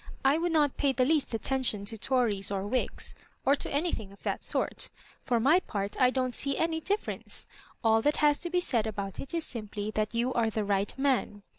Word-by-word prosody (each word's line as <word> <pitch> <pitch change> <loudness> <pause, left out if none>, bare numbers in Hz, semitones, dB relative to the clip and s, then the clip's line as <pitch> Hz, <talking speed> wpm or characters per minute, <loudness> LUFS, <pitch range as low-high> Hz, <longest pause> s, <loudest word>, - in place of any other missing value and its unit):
I 280 +4 +4
would 345 +1 0
not 295 -4 +2
pay 280 -2 +2
the 255 -1 +2
least 295 -5 +1
attention 235 -4 0
to 225 +2 -1
Tories 225 -4 +1
or 195 -1 -2
Whigs, 250 +5 0 0.3
or 275 - +5
anything 285 - -2
of 200 - -18
that - - -2
sort - - 0 0.4
For 240 -3 +2
my 290 +10 +5
part 200 - -4
I 250 - +6
don't 255 -1 -1
see 275 +1 +1
any 325 0 0
difference. 410 +5 -2 0.4
All 225 0 +4
that 295 +5 +2
has 295 -1 +3
to 345 - -2
be 360 +1 +1
said 235 -10 +1
about 200 -3 -5
ik 275 - -5
is 335 - 0
simply 215 -2 -5
that 215 +1 -2
you 240 +2 0
are 230 -2 +2
the 215 -1 -2
right 200 0 0
man. 260 -7 0
250 Hz, 205 wpm, -29 LUFS, 215-285 Hz, 0.4 s, I